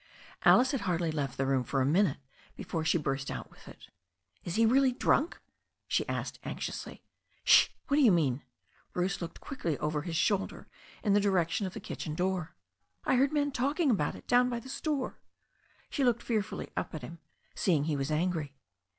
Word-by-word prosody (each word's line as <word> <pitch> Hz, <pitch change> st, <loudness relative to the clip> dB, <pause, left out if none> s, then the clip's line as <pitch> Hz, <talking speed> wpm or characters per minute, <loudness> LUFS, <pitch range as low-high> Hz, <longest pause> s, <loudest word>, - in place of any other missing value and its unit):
Alice 255 Hz, +1 st, +6 dB
had 275 Hz, -6 st, -1 dB
hardly 170 Hz, -4 st, 0 dB
left 140 Hz, -4 st, -3 dB
the 135 Hz, -, +1 dB
room 135 Hz, -1 st, +2 dB
for 135 Hz, +3 st, -1 dB
a 130 Hz, -, +3 dB
minute 160 Hz, +1 st, +3 dB, 0.4 s
before 165 Hz, -2 st, -3 dB
she 160 Hz, -, +3 dB
turst 135 Hz, -3 st, -2 dB
out -, -, -6 dB
with -, -, -18 dB
it. -, -, -13 dB, 0.5 s
Is 175 Hz, -, -4 dB
he 225 Hz, +1 st, +4 dB
really 260 Hz, +3 st, +4 dB
drunk?" 280 Hz, +5 st, +1 dB, 0.5 s
she -, -, 0 dB
asked -, -, -3 dB
anxiously. -, -, -5 dB, 0.4 s
'Shi -, -, +7 dB, 0.2 s
What 285 Hz, -, +2 dB
do -, -, +5 dB
you 235 Hz, -, +7 dB
mean?" 145 Hz, -7 st, +2 dB, 0.5 s
Bruce 185 Hz, +2 st, -1 dB
looked 170 Hz, -1 st, -6 dB
quickly 175 Hz, -, -3 dB
over 150 Hz, 0 st, -1 dB
his 165 Hz, +1 st, -4 dB
shoulder 195 Hz, +3 st, 0 dB, 0.4 s
in 205 Hz, -4 st, +3 dB
the 205 Hz, -, +5 dB
direction 190 Hz, -1 st, +1 dB
of 185 Hz, -, -8 dB
the -, -, -4 dB
kitchen 155 Hz, -2 st, -5 dB
door. 180 Hz, -1 st, -1 dB, 0.5 s
"I -, -, +3 dB
heard 270 Hz, +3 st, +4 dB
the 305 Hz, -, -5 dB
men 290 Hz, -1 st, +1 dB
talking 280 Hz, +4 st, +1 dB
about 150 Hz, -10 st, 0 dB
it -, -, -12 dB
down 250 Hz, 0 st, +4 dB
by 240 Hz, -1 st, -2 dB
the 260 Hz, -, -11 dB
store.'* 275 Hz, 0 st, -2 dB, 0.7 s
She 280 Hz, -, 0 dB
looked 240 Hz, -2 st, +2 dB
fearfully 215 Hz, -5 st, -2 dB
at 155 Hz, -, -3 dB
him, 170 Hz, 0 st, -8 dB, 0.3 s
seeing 160 Hz, -7 st, +2 dB
he 155 Hz, 0 st, 0 dB
was 135 Hz, 0 st, -2 dB
angry. 155 Hz, -2 st, -1 dB
185 Hz, 190 wpm, -30 LUFS, 155-245 Hz, 0.7 s, Shi